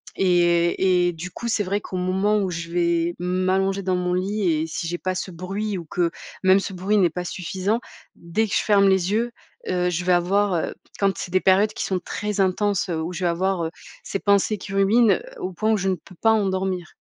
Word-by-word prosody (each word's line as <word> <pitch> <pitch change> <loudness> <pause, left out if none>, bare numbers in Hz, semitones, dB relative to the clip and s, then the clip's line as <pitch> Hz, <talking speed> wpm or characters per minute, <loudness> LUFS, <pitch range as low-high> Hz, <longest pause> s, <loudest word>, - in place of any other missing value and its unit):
et 175 0 +3
et - - -4
du 175 +3 -7
coup, 235 - -6
c'est 225 -2 +1
vrai 200 +2 -1
qu'au 185 - -6
moment 190 +4 +1
où 195 -2 -1
je 170 -1 -5
vais 170 0 +1
m'allonger 185 +2 0
dans 185 -1 0
mon 180 0 -1
lit 190 0 0
et 155 +1 -1
si 165 - -4
j'ai 175 +1 -2
pas 185 0 -2
ce 185 +1 -4
bruit 195 +4 -4
ou 170 - -9
que, 170 +2 0 0.3
même, 190 +1 +6
ce 195 0 -5
bruit 190 +4 0
n'est 185 -4 +4
pas 180 +2 -5
suffisant, 190 +4 -2 0.4
dès 170 +7 -1
que 205 - -5
je - - +3
ferme 200 -2 +4
les 190 0 +2
yeux, 235 +2 0 0.4
heu, 180 -1 +1
je 175 0 -2
vais 180 - +1
avoir, 190 +2 +2
heu, 165 - -1 0.3
quand 195 -3 +1
c'est 175 - -6
des 185 - +3
périodes 195 +3 +4
qui - - -3
sont 190 -1 -1
très 210 +3 -3
intenses 195 +1 +1
où 165 +1 -2
je 180 - -5
vais 175 - +3
avoir, 185 +1 0
heu, 160 - -4 0.3
ces 195 - -3
pensées 200 +1 +2
qui 195 - -8
ruminent, 200 +1 +4 0.2
au 185 +1 -4
point 215 +5 0
où 220 - +3
je 195 -1 -2
ne 190 - +1
peux 180 +3 -16
pas 225 - +5
en 215 -3 +2
dormir. 185 -2 -2
185 Hz, 230 wpm, -23 LUFS, 175-200 Hz, 0.4 s, même